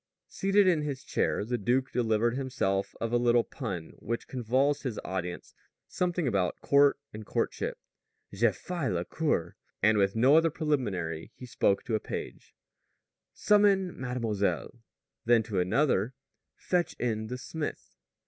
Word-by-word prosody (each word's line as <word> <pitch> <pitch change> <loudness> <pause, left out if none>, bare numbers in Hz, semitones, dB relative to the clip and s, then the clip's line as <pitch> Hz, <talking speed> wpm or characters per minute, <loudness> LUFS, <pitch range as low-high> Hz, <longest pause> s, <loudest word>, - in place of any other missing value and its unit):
Seated 195 +1 +2
in 170 -4 +3
his 140 -3 -4
chair, - - 0
the 120 +1 -2
duke 125 +6 +1
delivered 115 0 +1
himself 125 -8 -1
of 115 0 -2
a - - +5
little 120 -1 +4
pun 100 - -6
which 115 +2 -4
convulsed 130 +4 +1
his 125 -6 -4
audience 90 -1 -4 0.3
something 175 -4 -1
about 95 -6 0
"court 140 0 +4 0.2
and 105 +1 -7
courtship": - - -2 0.6
"Je 110 +4 +3
fais 150 - -3
la 85 -1 -1
cour." 120 - -1 0.3
And 110 0 +5
with 100 +1 +2
no 130 +6 +5
other 165 0 +4
preliminary 105 - -2
he 125 - -10
spoke 100 -4 +1
to 115 - -4
a 110 - +2
page: - - -7 0.8
"Summon 200 -3 +3
mademoiselle." 115 -7 -2 0.5
Then 115 -1 +4
to 105 -4 -2
another: 115 +4 +1 0.4
"Fetch 175 -1 -1
in 110 -2 -2
the 125 +2 -4
smith." 150 +4 -6
120 Hz, 145 wpm, -29 LUFS, 105-145 Hz, 0.8 s, a